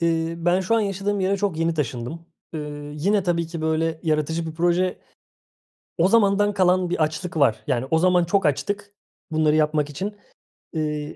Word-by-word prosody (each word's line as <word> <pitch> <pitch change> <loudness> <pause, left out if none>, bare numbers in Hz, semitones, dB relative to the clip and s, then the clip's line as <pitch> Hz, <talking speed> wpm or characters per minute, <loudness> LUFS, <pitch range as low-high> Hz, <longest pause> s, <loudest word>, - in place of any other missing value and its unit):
Iıı, 165 0 -1
ben 180 +2 +3
şu 220 +5 +1
an 225 - +3
yaşadığım 200 0 -1
yere 195 +1 +1
çok 195 -5 -1
yeni 165 0 +1
taşındım. 145 +3 -4 0.3
Iıı, 145 -1 -6
yine 195 +6 +1
tabii 170 -2 0
ki 165 -1 -6
böyle 160 0 0
yaratıcı 160 +1 0
bir 160 - -6
proje 175 +2 +1 1.0
O 170 +2 +4
zamandan 205 -2 +3
kalan 185 -2 +2
bir 170 -2 +1
açlık 160 +2 -3
var. 135 -7 +2
Yani, 130 -2 0
o 160 - +4
zaman 180 0 +4
çok 195 +1 +1
açtık 200 +8 -1 0.4
bunları 155 -1 +2
yapmak 150 -1 +1
için, 200 +8 -5 0.6
ııı, 150 -1 -3
165 Hz, 170 wpm, -23 LUFS, 155-185 Hz, 1.0 s, O